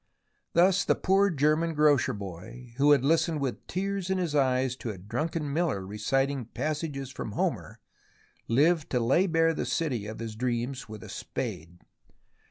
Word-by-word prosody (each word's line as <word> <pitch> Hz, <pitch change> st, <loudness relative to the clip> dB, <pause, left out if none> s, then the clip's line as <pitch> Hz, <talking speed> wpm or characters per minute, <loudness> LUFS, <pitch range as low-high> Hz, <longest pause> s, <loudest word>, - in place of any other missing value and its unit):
Thus 180 Hz, +3 st, +4 dB
the -, -, +2 dB
poor 195 Hz, +2 st, +3 dB
German 155 Hz, +1 st, +1 dB
grocer 150 Hz, -3 st, +4 dB
boy, 100 Hz, +6 st, -9 dB
who 145 Hz, +1 st, +4 dB
had 140 Hz, -3 st, +5 dB
listened 160 Hz, +1 st, +2 dB
with 135 Hz, -3 st, -4 dB
tears 195 Hz, 0 st, -2 dB
in 190 Hz, -, +1 dB
his 175 Hz, -5 st, -1 dB
eyes 130 Hz, -2 st, +2 dB
to 120 Hz, -, -5 dB
a 105 Hz, -, -5 dB
drunken 140 Hz, -, -3 dB
miller 150 Hz, -, 0 dB
reciting 135 Hz, +6 st, -1 dB
passages 145 Hz, +1 st, -3 dB
from 110 Hz, -, -6 dB
Homer, -, -, -2 dB, 0.7 s
lived 150 Hz, +6 st, +3 dB
to 125 Hz, -, +1 dB
lay 135 Hz, +11 st, +3 dB
bare 165 Hz, -1 st, +3 dB
the -, -, -2 dB
city 125 Hz, -11 st, -1 dB
of 110 Hz, -, -6 dB
his 115 Hz, -2 st, -6 dB
dreams 125 Hz, +1 st, -2 dB
with 110 Hz, -2 st, -8 dB
a -, -, -10 dB
spade. 85 Hz, +2 st, -6 dB
140 Hz, 165 wpm, -28 LUFS, 120-165 Hz, 0.7 s, had